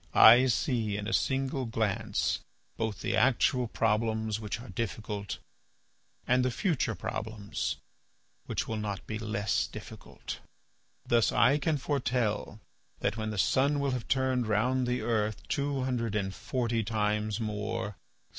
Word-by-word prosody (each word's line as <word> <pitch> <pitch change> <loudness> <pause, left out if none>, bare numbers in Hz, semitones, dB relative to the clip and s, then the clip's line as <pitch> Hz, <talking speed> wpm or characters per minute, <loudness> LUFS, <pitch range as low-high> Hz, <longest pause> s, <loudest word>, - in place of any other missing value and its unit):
"I 120 +4 +9
see 115 -4 0
in 105 0 -4
a - - -2
single 135 -1 0
glance 110 -4 0 0.4
both 110 -3 -3
the - - 0
actual 125 -1 +3
problems 110 -1 0
which 110 +1 -4
are 125 - -10
difficult, 105 -3 -4 0.9
and 125 0 +3
the 130 - +2
future 125 - 0
problems 110 -1 -3 0.7
which - - -2
will 110 - -2
not 105 -2 -4
be 110 0 -4
less 105 -2 0
difficult. - - -8 0.7
Thus 115 -2 +3
I 125 +7 +4
can 155 0 +1
foretell 125 -6 -1 0.4
that 100 - +1
when 110 -1 -3
the 105 - -4
sun 130 - +3
will 140 -1 +1
have 125 -3 -3
turned 130 -3 +1
round 125 +4 +2
the 125 0 0
earth 110 -2 -1
two 140 -2 0
hundred 115 -5 -1
and 95 -2 -1
forty 115 0 -1
times 105 0 0
more. 105 -1 -3
115 Hz, 140 wpm, -30 LUFS, 105-125 Hz, 0.9 s, I